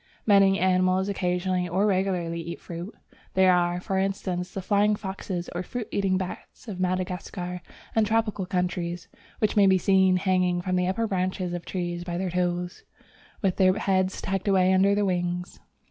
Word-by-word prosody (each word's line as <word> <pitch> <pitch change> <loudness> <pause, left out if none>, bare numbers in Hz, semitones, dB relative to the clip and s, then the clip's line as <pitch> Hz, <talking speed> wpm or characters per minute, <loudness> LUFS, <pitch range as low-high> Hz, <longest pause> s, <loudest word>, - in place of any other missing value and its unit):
Many 195 -2 +5
animals 185 +1 +2
occasionally 180 -1 -1
or 190 +4 +1
regularly 185 -4 0
eat 170 +1 -6
fruits. 175 +4 -8 0.4
There 190 -1 +5
are, 175 0 +1
for 190 +1 -2
instance, 185 -2 -2
the 195 - -5
flying 205 +2 +3
foxes 190 -3 -5
or 175 - -2
fruit 230 +4 -5
eating 195 -2 +1
bats 185 +5 -7
of 195 -4 -6
Madagascar 180 0 -3 0.3
and 225 - +4
tropical 215 -4 0
countries, 175 -2 -2 0.3
which 215 - 0
may 200 -2 +6
be 190 0 +5
seen 190 0 +4
hanging 180 -1 +1
from 185 +1 -1
the 180 0 +1
upper 195 +5 0
branches 185 -2 -2
of 175 -1 -5
trees 175 -2 -3
by 175 -1 -4
their 185 0 -2
toes, 180 0 -2 0.6
with 190 -2 +1
their 185 -1 +5
heads 190 -1 0
tucked 195 +1 -2
away 190 -1 +4
under 195 +2 +4
their 205 0 +1
wings. 180 -1 -2
185 Hz, 170 wpm, -26 LUFS, 180-195 Hz, 0.6 s, may